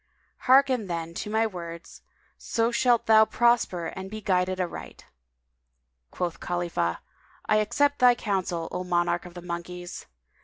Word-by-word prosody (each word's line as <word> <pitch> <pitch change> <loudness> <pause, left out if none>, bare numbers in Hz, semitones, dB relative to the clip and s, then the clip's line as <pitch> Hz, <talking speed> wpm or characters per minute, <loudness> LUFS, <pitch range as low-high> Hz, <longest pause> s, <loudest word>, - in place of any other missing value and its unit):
Hearken 260 -4 +4
then 165 -1 -4
to - - -6
my 220 +1 +2
words; 170 -5 -8 0.3
so 230 +1 -1
shalt 240 -1 +2
thou 220 0 +7
prosper 230 -7 +1
and 190 +3 -6
be 215 +1 -6
guided 185 -2 0
aright." 180 -2 -6 1.0
Quoth 170 - -4
Khalifah, 170 - -2 0.4
"I 215 - +3
accept 285 +7 +1
thy 245 -1 +6
counsel, 185 -6 -2
O 180 - -3
monarch 175 0 0
of 175 0 -13
all - - -7
the - - -12
monkeys! 175 +1 -6
185 Hz, 145 wpm, -26 LUFS, 175-220 Hz, 1.0 s, thou